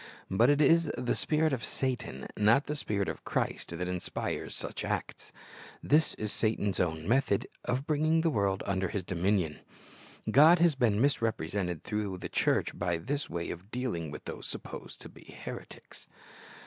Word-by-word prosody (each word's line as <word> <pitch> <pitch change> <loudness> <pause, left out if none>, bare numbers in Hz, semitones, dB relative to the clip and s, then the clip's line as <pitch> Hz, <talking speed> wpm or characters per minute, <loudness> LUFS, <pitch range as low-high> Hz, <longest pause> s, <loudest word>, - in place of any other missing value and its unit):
But 115 +7 +5
it 145 +1 +4
is 165 +2 +5
the 125 - 0
spirit 155 -1 +1
of 120 -4 -2
Satan, 125 - -2
not 110 +7 +4
the 150 - -3
Spirit 105 -8 -1
of - - -5
Christ, 85 - -2
that 90 +1 -2
inspires 90 -1 -3
such - - -4
acts. - - -3 0.5
Tliis 155 +2 +3
is 105 -1 -2
Satan's 105 -4 0
own 80 -2 -1
method 120 -4 +2 0.2
of 125 +3 -1
bringing 155 +1 +2
the 165 -1 +2
world 100 -5 0
under 95 -1 0
his 100 -1 -3
dominion. 90 -2 0 0.7
God 155 +8 +8
has 170 -1 +4
been 115 -6 +2
misrepresented 100 - 0
through 105 -3 -2
the 90 - -6
church - - +1
by 85 -1 0
this 140 - -3
way 85 0 -3
of 90 +4 -9
dealing 115 - -3
with 75 - -8
those - - -6
supposed - - -7
to - - -9
be - - -14
heretics. - - -9
105 Hz, 165 wpm, -30 LUFS, 90-140 Hz, 0.7 s, God